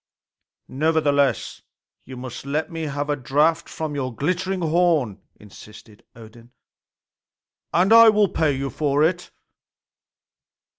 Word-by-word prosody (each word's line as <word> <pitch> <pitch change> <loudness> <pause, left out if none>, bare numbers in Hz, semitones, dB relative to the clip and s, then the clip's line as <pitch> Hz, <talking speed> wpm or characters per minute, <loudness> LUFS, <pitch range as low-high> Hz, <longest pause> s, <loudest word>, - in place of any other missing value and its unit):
"Nevertheless, 145 -4 0 0.4
you 130 0 -10
must 125 -1 -8
let 150 +5 -3
me 165 -1 -5
have 145 0 -4
a 145 - 0
draught 150 +5 0
from 155 -2 -5
your 130 -3 -3
glittering 180 +6 -2
horn," 160 - +1 0.2
insisted 105 +1 -15
Odin, 115 +1 -15 1.2
"and 185 +5 +3
I 230 0 +9
will 210 -1 +3
pay 160 -4 0
you 135 0 -4
for 145 +2 0
it." 175 +2 -1
145 Hz, 115 wpm, -22 LUFS, 130-165 Hz, 1.2 s, I